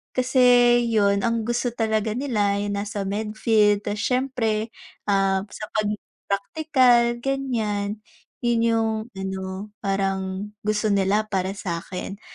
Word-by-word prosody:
Kasi 255 Hz, +1 st, +1 dB, 0.5 s
yun, 200 Hz, -3 st, +2 dB
ang 230 Hz, -1 st, 0 dB
gusto 240 Hz, +1 st, -1 dB
talaga 220 Hz, -2 st, 0 dB
nila 220 Hz, -7 st, 0 dB
ay 205 Hz, 0 st, -2 dB
yung 200 Hz, -, -2 dB
nasa 205 Hz, 0 st, -3 dB
medfield 210 Hz, 0 st, +1 dB
tas 205 Hz, 0 st, -3 dB
syempre, 240 Hz, -3 st, 0 dB, 0.4 s
ah, 195 Hz, -1 st, +2 dB
sa 215 Hz, -, -6 dB
pag 215 Hz, -1 st, +1 dB, 0.4 s
praktikal, 240 Hz, +2 st, +3 dB
ganyan. 225 Hz, -6 st, -2 dB, 0.4 s
Yun 235 Hz, -1 st, +2 dB
yung 225 Hz, -1 st, +2 dB, 0.3 s
ano, 190 Hz, +1 st, -5 dB
parang 195 Hz, 0 st, -2 dB
gusto 215 Hz, 0 st, 0 dB
nila 200 Hz, +2 st, +2 dB
para 195 Hz, -2 st, -2 dB
sakin. 185 Hz, +1 st, -5 dB
210 Hz, 120 wpm, -24 LUFS, 200-230 Hz, 0.5 s, praktikal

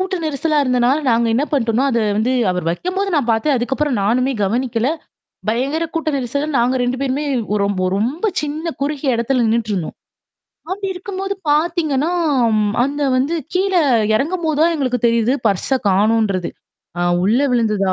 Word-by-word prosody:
கூட்ட 375 Hz, 0 st, -1 dB
நெரிசலா 305 Hz, +1 st, 0 dB
இருந்தனால 250 Hz, +3 st, +2 dB
நாங்க 230 Hz, 0 st, +2 dB
என்ன 270 Hz, +5 st, +2 dB
பண்ணோட்ம்னா 245 Hz, -1 st, +1 dB
அத 235 Hz, -, +1 dB, 0.2 s
வந்து 230 Hz, +4 st, +1 dB, 0.2 s
அவர் 180 Hz, -2 st, -3 dB
வைக்கும்போது 370 Hz, -, -2 dB
நான் 260 Hz, -5 st, 0 dB
பார்த்தேன். 225 Hz, +6 st, +1 dB
அதுக்கப்புறம் 265 Hz, 0 st, -1 dB
நானுமே 250 Hz, +6 st, +1 dB
கவனிக்கல. 235 Hz, +3 st, 0 dB, 0.6 s
பயங்கர 270 Hz, +9 st, 0 dB
கூட்ட 325 Hz, -1 st, -1 dB
நெரிசல் 280 Hz, +4 st, -2 dB
நாங்க 245 Hz, +2 st, +2 dB
2 245 Hz, +1 st, -1 dB
பேருமே 275 Hz, +2 st, -1 dB, 0.3 s
ஓரொ 200 Hz, -1 st, +1 dB, 0.3 s
ரொம்ப 255 Hz, -, -2 dB, 0.2 s
சின்ன 300 Hz, +3 st, -4 dB
குறுகிய 280 Hz, -2 st, -1 dB
இடத்துல 240 Hz, +2 st, +1 dB
நின்னுட்டுருந்தோம். 215 Hz, -6 st, -1 dB, 0.7 s
அப்படி 390 Hz, +1 st, -3 dB
இருக்கும்போது 390 Hz, +1 st, -4 dB, 0.2 s
பாத்தீங்கன்னா, 310 Hz, -1 st, +1 dB, 0.7 s
அந்த 285 Hz, +2 st, -1 dB
வந்து 275 Hz, +6 st, 0 dB, 0.2 s
கீழ 380 Hz, +1 st, 0 dB, 0.4 s
எறங்கும்போது 315 Hz, +3 st, 0 dB
தான் 335 Hz, +1 st, +3 dB
எங்களுக்கு 255 Hz, -3 st, -1 dB
தெரியுது. 230 Hz, +1 st, +2 dB
பர்ஸ 210 Hz, +7 st, +1 dB
காணுன்றது. 200 Hz, -2 st, +1 dB, 0.5 s
ஆ -, -, -1 dB, 0.2 s
உள்ள 220 Hz, +7 st, +3 dB
விழுந்துதா 215 Hz, -5 st, +1 dB
260 Hz, 140 wpm, -18 LUFS, 230-305 Hz, 0.7 s, தான்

